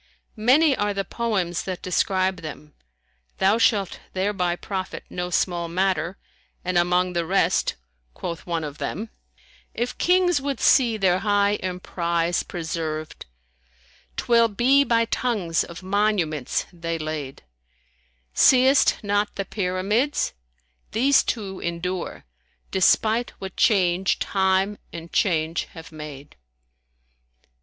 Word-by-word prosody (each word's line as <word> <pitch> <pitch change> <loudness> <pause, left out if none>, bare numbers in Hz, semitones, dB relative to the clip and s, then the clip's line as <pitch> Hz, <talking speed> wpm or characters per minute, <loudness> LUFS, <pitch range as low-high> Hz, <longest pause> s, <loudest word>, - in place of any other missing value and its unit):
Many 265 +7 +4
are 205 -2 -1
the 195 0 -1
poems 190 -6 -1
that 185 -2 -5
describe 185 0 +1
them, 150 -2 -9 0.6
thou 200 +4 +3
shalt 205 -4 +2
thereby 185 -2 0
profit 190 +1 -5
no 180 0 -3
small 175 -1 0
matter, 180 0 0 0.5
and 185 0 -1
among 180 +1 +2
the 170 -1 0
rest, 190 +4 +1 0.4
quoth 170 0 -6
one 165 -2 -1
of 150 -1 -7
them, 215 +5 -4 0.6
"If 240 +1 -2
Kings 355 -3 +3
would 275 0 -3
see 235 -5 +4
their 185 -3 +2
high 205 0 +2
emprize 175 -2 -1
preserved, 160 - -5 0.4
* 65 +2 -32
Twill 235 -1 +4
be 250 +6 +4
by 230 -3 +2
tongues 210 -9 0
of 170 +2 -10
monuments 190 - 0
they 165 -1 -3
laid: 155 -4 -5 0.9
Seest 260 - +5
not 205 0 0
the 195 - -3
Pyramids? 200 - 0 0.6
These 270 +5 +4
two 195 -5 -4
endure 170 +1 -4 0.2
* - - -41
Despite 220 +5 +2
what 190 -1 -7
change 185 -4 +2
Time 190 +1 +1
and 165 0 -9
Change 165 -3 +1
have 165 -1 -10
made." 150 -2 -10
185 Hz, 120 wpm, -24 LUFS, 170-215 Hz, 0.9 s, Seest